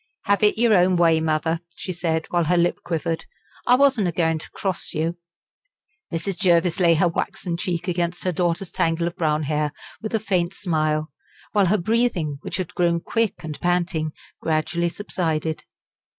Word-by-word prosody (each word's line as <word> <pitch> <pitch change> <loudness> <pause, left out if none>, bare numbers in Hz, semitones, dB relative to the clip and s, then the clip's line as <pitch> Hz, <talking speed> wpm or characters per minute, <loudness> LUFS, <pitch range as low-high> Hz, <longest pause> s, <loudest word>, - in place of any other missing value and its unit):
"Have 200 0 +2
it 210 0 +4
your 230 -1 +4
own 180 -1 +4
way, 165 -2 +4
mother," 160 +1 0 0.2
she 185 - -5
said, 165 -2 -1
while 175 -1 +2
her 175 +3 +2
lip 175 +1 +2
quivered; 165 -1 -2 0.4
"I 245 - +7
wasn't 260 -7 +3
a - - 0
goin' 165 -1 +1
to - - -8
cross 190 -3 -2
you." 165 +2 0 1.0
Mrs. 180 +3 -3
Jervis 175 -2 +3
laid 170 -2 +5
her 175 - +4
waxen 170 +1 -2
cheek 175 0 -2
against 175 0 -1
her 185 - +1
daughter's 175 +1 -1
tangle 165 +1 +1
of 170 +1 -3
brown 155 -4 +1
hair 150 0 0 0.3
with 220 +1 -2
a - - +2
faint 185 -3 0
smile, 155 -3 0 0.4
while 200 -3 +3
her 210 +5 +3
breathing, 180 - 0
which - - -4
had 185 -3 -4
grown 170 -1 +2
quick 225 +3 -1
and 155 -2 -6
panting, 175 -3 0 0.3
gradually 160 +2 0
subsided. 160 -5 -2
170 Hz, 175 wpm, -23 LUFS, 160-185 Hz, 1.0 s, I